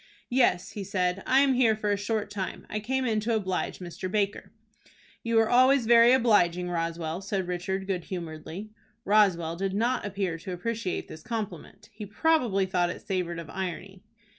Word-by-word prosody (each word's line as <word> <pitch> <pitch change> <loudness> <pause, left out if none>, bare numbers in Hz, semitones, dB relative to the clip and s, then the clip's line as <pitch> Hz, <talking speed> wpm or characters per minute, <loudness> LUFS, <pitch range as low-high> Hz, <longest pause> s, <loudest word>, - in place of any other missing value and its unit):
"Yes," 240 -8 +2
he 205 - -5
said. 180 0 -1
"I 265 +1 +5
am 275 -1 +4
here 240 -4 +3
for 210 -1 -1
a - - +3
short 210 +1 -2
time. 195 -2 -5
I 215 - -1
came 260 +4 -1
in 220 -3 +1
to 225 +2 0
oblige 190 -4 -2
Mr. 180 +1 -6
Baker." 205 -1 -1 0.7
"You 230 0 -1
were 225 0 +5
always 255 +1 +5
very 235 +1 +7
obliging, 180 -8 +3
Roswell," 165 0 -3
said 195 -2 -2
Richard, 185 +2 -3
good 185 -3 -3
humoredly. 175 +3 -7 0.3
Roswell 185 -6 +3
did 195 +2 -2
not 235 +4 +1
appear 195 -4 -3
to 185 +2 -6
appreciate 215 +1 -3
this 155 - -10
compliment. 220 -8 -6
He 210 0 -8
probably 225 -5 +2
thought 180 -2 +1
it - - -7
savored 180 -3 -2
of 165 -3 -8
irony. 190 0 -5
195 Hz, 175 wpm, -27 LUFS, 180-225 Hz, 0.7 s, very